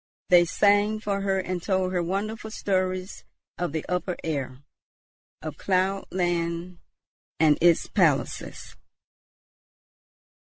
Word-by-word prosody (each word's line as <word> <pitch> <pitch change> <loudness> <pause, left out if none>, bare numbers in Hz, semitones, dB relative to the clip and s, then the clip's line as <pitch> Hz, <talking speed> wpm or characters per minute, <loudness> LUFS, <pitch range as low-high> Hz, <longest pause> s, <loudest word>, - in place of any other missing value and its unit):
They 175 -2 +7
sang 205 +4 +3
for 200 -2 -2
her 195 -1 +1
and 185 -1 -3
told 185 0 0
her 180 - +1
wonderful 210 +5 -3
stories 185 -2 -2 0.4
of 175 -3 -1
the 160 0 -3
upper 180 0 -1
air, 140 -4 -4 0.8
of - - -6
cloud 190 +1 0
land 175 -1 -2 0.6
and 155 -2 +5
its 170 -1 +5
palaces. - - 0
185 Hz, 110 wpm, -26 LUFS, 170-195 Hz, 0.8 s, They